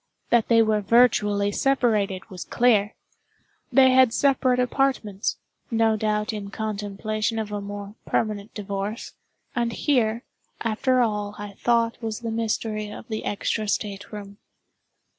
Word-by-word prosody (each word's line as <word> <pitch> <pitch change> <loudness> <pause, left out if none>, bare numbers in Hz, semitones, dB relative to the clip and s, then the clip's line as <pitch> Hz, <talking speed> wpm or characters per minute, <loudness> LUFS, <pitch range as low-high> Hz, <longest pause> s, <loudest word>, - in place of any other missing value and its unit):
That 235 -2 +4
they 230 -1 +5
were 215 -1 +1
virtually 205 -2 +3
separated 215 -7 +1
was 180 -2 -6
clear. 215 -4 +2 0.8
They 260 +1 +6
had 260 -2 +6
separate 260 -2 +3
apartments—no 230 -3 0
doubt 210 0 -1
in 205 -2 -5
contemplation 215 +1 -3
of 215 -1 -3
a 205 -1 -3
more 205 0 -7
permanent 215 -1 -1
divorce; 205 +2 -4 0.4
and 235 -1 0
here, 230 -3 +1 0.4
after 250 +3 +1
all 210 -3 -1
I 205 0 -7
thought 230 +2 +1
was 220 0 -4
the 230 -1 -3
mystery 220 -1 -2
of 225 - -10
the 220 -1 -4
extra 215 +1 -1
state 200 -1 -3
room. 200 -1 -9
215 Hz, 130 wpm, -24 LUFS, 205-235 Hz, 0.8 s, They